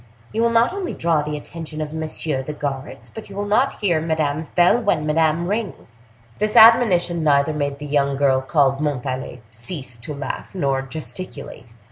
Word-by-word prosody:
You 225 - 0
will 235 - +3
not 230 +7 +3
only 385 -2 -4
draw 165 -2 +1
the 150 0 -4
attention 160 +1 -8
of 155 0 -4
messieurs 155 -3 -3
the 150 - -3
guards, 140 -2 -5
but 220 - -10
you 195 - -10
will 205 +1 -2
not 220 +6 +1
hear 175 -6 +2
Madame's 155 -1 -1
bell 180 +7 +4
when 200 -9 +1
Madame 160 +2 +1
rings." 200 - -4 0.4
This 210 +1 -1
admonition 190 -7 +6
neither 145 0 +3
made 145 -2 -2
the 145 - -8
young 140 -1 +1
girl 135 -2 +3
called 135 -1 +2
Montalais 130 -4 -3
cease 130 - -5
to 125 +6 -7
laugh 140 +6 -6
nor 140 -6 0
gesticulate. 150 0 -8
155 Hz, 175 wpm, -21 LUFS, 140-180 Hz, 0.4 s, admonition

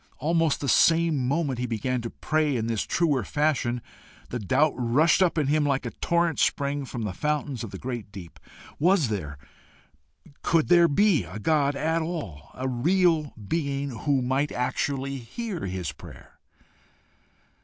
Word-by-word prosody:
almost 165 +1 +1
the 140 - -2
same 165 -1 +3
moment 140 -3 0
he 125 - -1
began 120 +2 -2
to 115 - -5
pray 155 0 0
in 115 -2 -1
this 115 -2 -2
truer 150 -8 +1
fashion, 135 -4 0 0.5
the 125 - -3
doubt 145 +9 +2
rushed 130 +9 +3
up 180 -3 +2
in 155 - +2
him 150 +2 +2
like 140 -2 0
a - - -3
torrent 170 -3 0
spring 140 0 0
from 120 -3 -5
the 105 -4 -3
fountains 145 0 -2
of 115 - -5
the - - -8
great 120 -5 -6
deep 95 -5 -11 0.4
Was 170 - +3
there 75 -9 -4 1.0
could 165 -2 +1
there 175 -1 +6
be 180 +2 +3
a - - -8
God 145 +4 +1
at 160 +3 0
all? 160 - -5
a 130 +1 -3
real 160 +4 +2 0.2
being 140 -2 -2
who 130 +3 0
might 135 +4 0
actually 135 +2 -2
hear 175 - -5
his 90 -4 -3
prayer? - - -14
140 Hz, 160 wpm, -26 LUFS, 120-160 Hz, 1.0 s, there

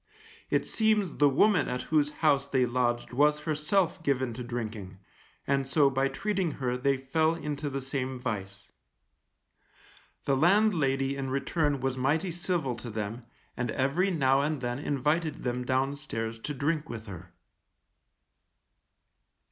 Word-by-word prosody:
It - - +1
seems 215 -5 +1
the 145 -1 +5
woman 180 +3 +3
at 125 0 -2
whose 150 -2 +4 0.2
house 140 -2 +4
they 130 -2 +3
lodged 120 0 -1
was 150 +3 +3
herself 165 +4 0
given 130 -5 0
to 125 +2 -6
drinking, 110 -5 -5 0.5
and 135 -1 +1
so 140 0 +4
by 135 +1 +1
treating 190 +3 -1
her 125 -2 -2
they 135 +2 +1
fell 155 +5 +1
into 150 -2 -4
the 135 -1 -4
same 130 -1 -3
vice. 100 -5 -5 1.5
The 140 - +2
landlady 150 -6 +3
in 135 -1 -3
return 140 +1 0
was 135 -1 -1
mighty 155 +8 +1
civil 170 -6 -1
to 120 - -7
them, 110 +2 -5 0.3
and 125 -1 -2
every 140 +11 +1
now 135 -6 +3
and 150 0 -1
then 120 0 -3
invited 150 +3 -1
them 125 0 -1
downstairs 130 -4 -2
to 150 - -4
drink 150 +3 -1
with 110 -2 -6
her. 90 -4 -10
135 Hz, 140 wpm, -29 LUFS, 125-155 Hz, 1.5 s, the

